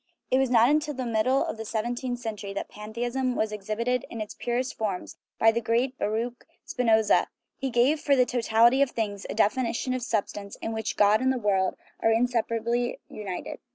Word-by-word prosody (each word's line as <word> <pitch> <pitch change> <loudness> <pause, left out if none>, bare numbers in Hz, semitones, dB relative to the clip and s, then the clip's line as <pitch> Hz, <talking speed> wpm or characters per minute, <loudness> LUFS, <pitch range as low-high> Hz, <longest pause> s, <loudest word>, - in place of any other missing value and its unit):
It 260 - +4
was 265 -1 +2
not 235 -1 +5
until 300 +1 +1
the 255 -1 -3
middle 235 +4 +2
of - - -4
the 220 - -5
seventeenth 240 +3 -2
century 210 -4 -5
that 200 - -4
pantheism 240 +4 -3
was 215 0 0
exhibited 220 +4 -1
in 230 - -7
its 215 -1 -5
purest 245 +2 -2
form 200 -5 -2 0.3
by 225 - +5
the 235 +1 -1
great 240 +4 0
Baruch 230 +3 -2 0.2
Spinoza; 220 -4 +3 0.3
he 270 - -1
gave 255 +6 +3
for 285 -1 +3
the 250 -2 +4
totality 240 +1 +3
of 280 - +4
things 205 -4 -3
a - - -4
definition 235 +3 +1
of 255 - -2
substance 205 -3 -3
in 225 - -4
which 220 -1 -3
God 210 +2 +5
and 260 0 +3
the 260 - 0
world 195 -4 +1 0.2
are 225 - +2
inseparably 235 0 0
united. 195 -4 -6
235 Hz, 190 wpm, -27 LUFS, 215-250 Hz, 0.3 s, not